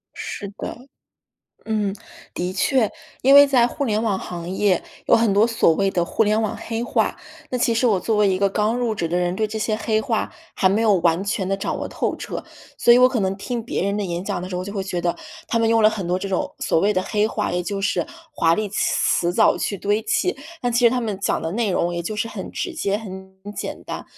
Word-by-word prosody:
是 205 - -5
的， 250 +3 -7 0.8
嗯， 210 -3 -1 0.4
的 180 +1 -2
确。 220 +4 +2 0.3
因 270 +2 +6
为 285 0 +10
在 255 -4 +4
互 280 +3 -3
联 215 -4 0
网 210 -4 0
行 175 -2 -6
业 190 -1 +1 0.2
有 - - +6
很 225 -3 +2
多 205 +3 +4
所 230 -7 +3
谓 195 +3 +1
的 175 -2 0
互 195 - +1
联 215 0 +2
网 215 -2 -1
黑 225 0 -4
话， 240 - 0 0.3
那 255 - -1
其 235 - +2
实 230 +2 +2
我 210 -5 +3
作 220 +4 0
为 210 -1 +4
一 185 -1 +1
个 200 0 +3
刚 210 +3 +1
入 240 -3 0
职 170 -5 -2
的 175 - -1
人， 175 0 0
对 215 +3 0
这 215 +1 -5
些 215 0 0
黑 220 0 0
话 225 -4 -1 0.2
还 190 - +3
没 205 +4 +1
有 215 -3 +4
完 170 +1 +1
全 200 -2 -1
地 195 - 0
掌 195 - -3
握 - - -4
透 - - -2
彻， - - -6 0.3
所 240 - +6
以 240 - +7
我 250 0 +7
可 255 -3 -1
能 190 -1 0
听 235 +4 -4
别 240 - -2
人 200 +1 0
的 210 - -1
演 175 -1 -3
讲 175 - -2
的 185 - -5
时 - - -4
候， 180 - -2
我 - - -5
就 200 - -6
会 200 -2 -2
觉 180 -2 -3
得 175 0 -1 0.3
他 230 - +1
们 230 - +2
用 225 0 +4
了 215 - +7
很 205 -5 -4
多 180 +1 0
这 195 +1 -4
种 190 -2 -2
所 - - +1
谓 200 +5 +3
的 185 - 0
黑 210 +2 +1
话， - - -2
也 180 0 0
就 200 +2 -3
是 200 - 0 0.3
华 165 - +3
丽 215 +2 -2
词 175 -3 +1
藻 - - +4
去 200 - -2
堆 205 +4 0
砌。 255 +11 0 0.2
但 245 - 0
其 240 +1 +2
实 235 - +7
他 250 +1 0
们 215 -5 -3
讲 - - 0
的 160 - -3
内 220 0 0
容 175 -1 0
也 170 - -2
就 195 +6 -4
是 225 +2 -2
很 - - -7
直 365 - -4
接 200 -11 0
很 190 -3 -9 0.2
简 - - -5
单， - - -6
210 Hz, 280 characters per minute, -22 LUFS, 185-230 Hz, 0.8 s, 为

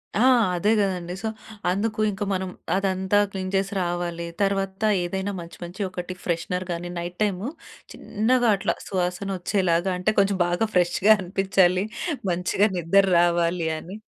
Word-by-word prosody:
ఆ! - - +1 0.4
అదే 200 +5 +2
గదండీ. 180 -3 -1
సో, - - 0 0.4
అందుకు 215 +3 -1
ఇంక 195 +1 -9
మనం 190 0 -2 0.3
అదంతా 190 0 +1
క్లీన్ 185 -1 -4
చేసి 195 +1 0
రావాలి. 175 -1 -3
తర్వాత 195 0 0 0.2
ఏదైనా 190 +3 -2
మంచి 170 0 -11
మంచి 175 +4 -7
ఒకటి 185 0 -5
ఫ్రెషనర్‌ 180 +2 -2
గానీ 175 +1 -4
నైట్ 175 +1 -6
టైమ్ 195 -3 -1 0.5
చిన్నగా 240 +3 +1
అట్లా - - -1
సువాసనొచ్చేలాగా 185 -1 0
అంటే 180 - +1
కొంచెం 200 0 +2
బాగా 175 +6 0
ఫ్రెష్‌గా 180 +4 +3
అనిపించాలి. 190 0 +2 0.5
మంచిగా 180 +4 +2
నిద్ర 180 +4 +4
రావాలి 170 -1 +2
అని 185 +6 -9
185 Hz, 135 wpm, -24 LUFS, 175-195 Hz, 0.5 s, నిద్ర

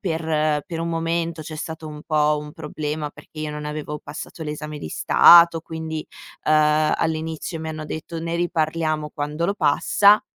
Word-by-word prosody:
per 155 -4 0
per 165 -1 -4
un 170 - -2
momento 165 0 -1
c'è 155 0 -7
stato 160 0 -6
un 150 0 -9
po' 150 -1 +2
un 150 0 -9
problema 150 -1 -4
perché 155 - -12
io 155 - -3
non 150 0 -6
avevo 150 0 -4
passato 155 +2 -8
l'esame 150 0 -5
di 80 - -6
Stato, 170 - +7
quindi, 160 -1 -5 0.4
ehm, 155 0 +4
all'inizio 160 +1 -2
mi 160 - -5
hanno 155 -1 -5
detto: 160 +2 -6
"Ne 165 +1 -3
riparliamo 155 -2 -1
quando 150 +2 -3
lo 200 +3 +1
passa." 200 +5 +4
155 Hz, 170 wpm, -23 LUFS, 150-165 Hz, 0.4 s, Stato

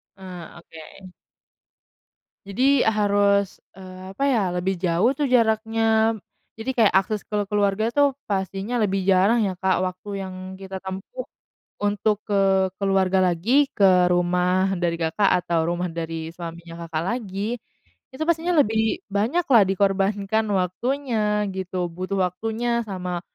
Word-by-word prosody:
Ah, 185 -3 -10
oke. 165 +4 -13 1.4
Jadi 260 +8 +2
a 220 - +4
harus, 200 -1 +2 0.2
eee 185 0 -10
apa, 235 - -3
ya, 240 -5 +2
lebih 185 +2 -1
jauh, 180 +5 +2
tuh, 295 - +1
jaraknya, 225 -2 +2 0.4
jadi 225 +3 -5
kayak 220 -3 +4
akses 195 +2 +1
ke 210 - -3
keluarga, 205 +2 +1
tuh, 285 +2 +2 0.2
pastinya 195 +3 -2
lebih 195 -2 +1
jarang, 195 +5 +4
ya, 190 - -1
Kak. 190 0 +1
Waktu 185 +2 -4
yang 190 -1 -6 0.3
kita 190 0 -7
tempuh 195 - -6 0.6
untuk 205 +1 0
ke 195 -2 +3
keluarga 195 -1 +2
lagi, 195 - +3
ke 185 -3 +4
rumah 180 +2 +1
dari 170 -1 -1
Kakak, 165 +5 +1
atau 165 -2 0
rumah 175 +1 -2
dari 165 -1 -5
suaminya 170 -1 -8
Kakak 160 -1 -3
lagi, 210 +1 -3 0.6
itu 295 - -5
pastinya 340 +1 +1
lebih 220 -3 +1
banyak, 225 - 0
lah, 230 -5 +7
dikorbankan 195 +2 +1
waktunya, 210 +2 -1
gitu, 185 -1 -3
butuh 185 +3 -4
waktunya 225 +5 -2
sama 180 -2 -4
195 Hz, 135 wpm, -23 LUFS, 185-220 Hz, 1.4 s, lah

